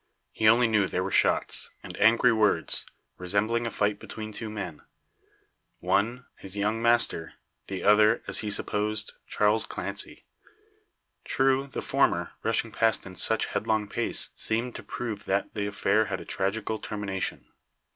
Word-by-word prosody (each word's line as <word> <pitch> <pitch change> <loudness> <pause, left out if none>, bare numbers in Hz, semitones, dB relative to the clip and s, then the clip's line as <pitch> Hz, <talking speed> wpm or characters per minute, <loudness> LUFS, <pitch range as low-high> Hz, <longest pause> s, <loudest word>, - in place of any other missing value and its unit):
He 110 - +1
only 115 +2 +6
knew 105 -3 +2
there 90 - -1
were 95 - -3
shots, - - +1
and - - -8
angry 115 +3 +5
words, 105 -7 +1 0.3
resembling 105 +6 0
a - - -1
fight 105 -1 0
between 110 -1 -7
two 110 +1 -5
men; 95 -7 -6 1.0
one 100 +7 0
his 95 0 -5
young 105 +2 0
master; 115 -8 +2 0.3
the 95 - -5
other, 105 +2 +5
as - - 0
he 105 - -3
supposed, 105 +1 -1
Charles 105 +1 +2
Clancy. - - -5 1.0
True, 135 +1 +1
the 135 - -5
former, - - +1
rushing 115 0 0
past 110 +1 +1
in 95 -1 -10
such 110 +4 +1
headlong 110 -1 -1
pace, - - 0
seemed 115 +2 -1
to - - -7
prove 110 -4 -5
that 100 +1 -1
the 100 -1 -2
affair 105 +1 +2
had - - -3
a - - -9
tragical 110 +3 -2
termination. 100 -3 -4
105 Hz, 150 wpm, -27 LUFS, 100-115 Hz, 1.0 s, only